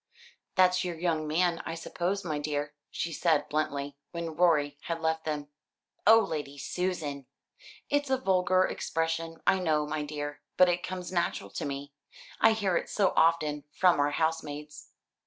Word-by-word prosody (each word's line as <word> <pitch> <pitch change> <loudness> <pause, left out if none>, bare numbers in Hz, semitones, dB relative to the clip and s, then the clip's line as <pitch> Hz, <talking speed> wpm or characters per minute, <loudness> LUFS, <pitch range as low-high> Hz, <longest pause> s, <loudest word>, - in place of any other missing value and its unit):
"That's 185 0 +4
your 175 -2 -3
young 160 -3 0
man, 170 +2 +1
I 165 - -4
suppose, 185 +4 -2
my 155 -3 -1
dear," 145 0 -2 0.2
she 170 - -3
said 155 -3 +2
bluntly, 145 -2 -2
when 165 -2 -5
Rorie 150 -4 +3
had 165 -1 -2
left 160 0 -1
them. 150 -2 -3 0.6
"Oh, 225 0 +9
Lady 150 -8 -4
Susan!" 150 -3 -3 0.6
"It's 285 -1 0
a 265 - +3
vulgar 185 -5 +3
expression, 165 0 -2
I 190 - +4
know, 155 -4 +1
my 150 0 -2
dear, 145 0 -5 0.2
but 185 -1 +7
it 175 0 +1
comes 185 0 -5
natural 170 - -1
to - - -4
me; 140 0 -5 0.5
I 225 - +6
hear 200 -5 0
it - - -3
so 200 -3 +2
often 155 -3 +2
from 180 -4 +4
our 145 0 +3
housemaids. 150 -1 -3
165 Hz, 160 wpm, -29 LUFS, 150-180 Hz, 0.6 s, Oh